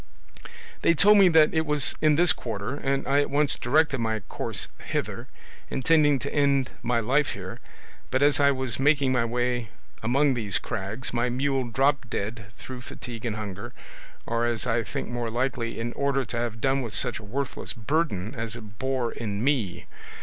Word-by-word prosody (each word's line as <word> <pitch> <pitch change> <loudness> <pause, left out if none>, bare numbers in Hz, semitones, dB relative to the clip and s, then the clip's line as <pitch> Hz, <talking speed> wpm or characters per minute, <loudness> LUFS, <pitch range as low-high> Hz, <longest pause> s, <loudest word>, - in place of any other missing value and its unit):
They 170 - +4
told 205 +5 +6
me 195 - +8
that 160 -2 +5
it 160 -1 +2
was 150 -3 +1
in 155 -1 +4
this 175 +2 +6
quarter, 105 - -4
and 135 -1 -1
I 140 +1 +3
at 145 - -1
once 145 0 +3
directed 140 +1 +2
my 110 -2 -1
course - - -4 0.2
hither, - - -3 0.4
intending 145 +1 +3
to - - -5
end 140 -3 +2
my 120 -1 +1
life 135 +6 +1
here; - - -7 0.5
but 130 +2 +1
as 145 0 +4
I 140 0 +5
was 130 -4 -1
making 140 -1 +3
my 125 -2 +2
way 120 -1 -1 0.3
among 135 +5 +2
these 105 -6 -1
crags, 110 +2 -4
my 120 +1 +1
mule 135 +1 0
dropped 135 +2 +1
dead 110 +2 -4
through 130 -1 -8
fatigue 120 -1 -7
and 110 - -2
hunger, 100 -2 -6 0.5
or, 115 0 -1
as 120 0 -2
I 120 -1 +1
think 105 - -5
more 120 -1 -3
likely, 120 -1 -2
in 120 +1 -3
order 140 -1 0
to 115 +2 -4
have 115 -1 -2
done 135 0 +2
with 115 -4 -2
such 125 -3 +2
a - - -12
worthless 130 +6 -4
burden 115 - -1
as 115 -3 -4
it 105 -4 -11
bore 130 -3 -1
in 105 -2 -4
me. 120 -11 0
125 Hz, 185 wpm, -26 LUFS, 115-140 Hz, 0.5 s, me